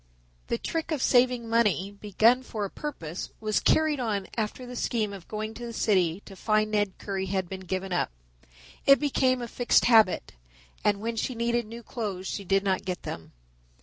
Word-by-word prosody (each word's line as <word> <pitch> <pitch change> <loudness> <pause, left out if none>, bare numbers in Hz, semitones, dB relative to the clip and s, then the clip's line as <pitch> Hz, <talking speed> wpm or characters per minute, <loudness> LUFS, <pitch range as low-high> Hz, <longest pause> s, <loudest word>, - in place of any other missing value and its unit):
The 115 - 0
trick 325 - -3
of 310 -3 -1
saving 250 -2 +3
money, 210 -4 +2
begun 215 +5 +3
for 220 -5 -4
a 195 - -6
purpose, 175 - -5
was 215 -1 +1
carried 310 -2 +3
on 210 -5 -1
after 225 +3 -3
the 245 0 -8
scheme 220 -4 -1
of 195 -3 -10
going 215 +1 -4
to 235 +2 -9
the 235 - -6
city 185 -5 +1
to 195 - -11
find 215 +2 +1
Ned 205 -3 0
Currie 195 -1 -3
had 190 -1 -1
been 190 +1 -6
given 190 0 -3
up. 175 - +1 0.8
It 275 0 +8
became 260 -3 +1
a - - -4
fixed 240 +1 +3
habit, 220 -6 +4 0.5
and 205 -1 +2
when 230 +1 -3
she 250 +3 -1
needed 235 0 0
new 230 +2 -9
clothes 205 -7 -4
she 200 - -4
did 195 +1 +2
not 190 -2 0
get 180 -1 -4
them. 80 - -7
215 Hz, 190 wpm, -27 LUFS, 195-240 Hz, 0.8 s, It